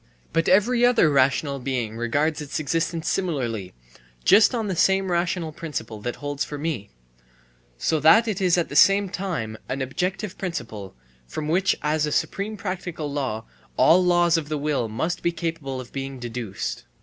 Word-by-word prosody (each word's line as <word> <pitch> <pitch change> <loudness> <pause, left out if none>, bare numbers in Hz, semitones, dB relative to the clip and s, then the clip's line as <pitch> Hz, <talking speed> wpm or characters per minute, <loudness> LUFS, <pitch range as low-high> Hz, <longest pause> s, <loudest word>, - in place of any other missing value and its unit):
But 165 0 +2
every 235 +6 +4
other 240 -10 +5
rational 140 +1 +2
being 125 -4 -2
regards 145 +7 0
its 145 0 -4
existence 165 +2 -1
similarly, 120 - -2 0.5
just 215 +5 +6
on 225 -2 -1
the 190 -3 -2
same 190 +2 +2
rational 170 -1 0
principle 120 -9 -6
that 120 +2 -3
holds 145 0 -3
for 145 - -6
me: 145 -9 -3 0.4
* - - -33 0.3
so 155 - +1
that 220 +10 +6
it 205 -3 -2
is 180 -2 +3
at 175 - 0
the - - -7
same 195 0 +5
time 155 - -4
an 130 - -2
objective 180 +9 -3
principle, 115 - -5 0.3
from 150 - -5
which 185 +5 +2
as 150 0 +1
a - - -3
supreme 205 +7 -1
practical 175 -6 -4
law 130 -6 -2 0.3
all 180 +3 +6
laws 175 -1 +4
of 155 -2 -4
the 155 - -1
will 145 -5 -1
must 160 +11 -2
be 170 - +1
capable 160 -6 -4
of 125 -2 -10
being 135 0 -5
deduced. 120 -4 -5
155 Hz, 175 wpm, -24 LUFS, 130-180 Hz, 0.5 s, just